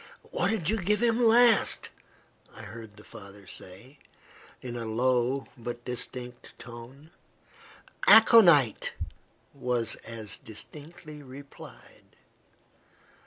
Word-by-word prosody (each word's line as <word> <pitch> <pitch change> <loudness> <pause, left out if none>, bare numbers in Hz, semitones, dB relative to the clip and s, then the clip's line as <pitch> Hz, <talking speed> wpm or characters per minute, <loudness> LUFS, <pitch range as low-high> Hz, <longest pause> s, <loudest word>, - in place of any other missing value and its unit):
"What - - 0
did 210 -8 -2
you 220 +4 +1
give 210 +3 0
him 235 +1 +2
last?" 235 0 +4 0.6
I - - -11
heard 110 -1 -11
the 105 - -15
father 100 -1 -14
say, 115 +11 -12 0.6
in 120 -1 -7
a 120 - -4
low, 125 +3 0
but 120 0 -8
distinct 125 0 -6
tone. 120 +6 -13 1.0
"Aconite," 175 - +6 0.6
was 125 -4 -1
as 110 -2 -7
distinctly 150 +6 -11
replied. 140 +1 -15
125 Hz, 100 wpm, -27 LUFS, 115-160 Hz, 1.0 s, Aconite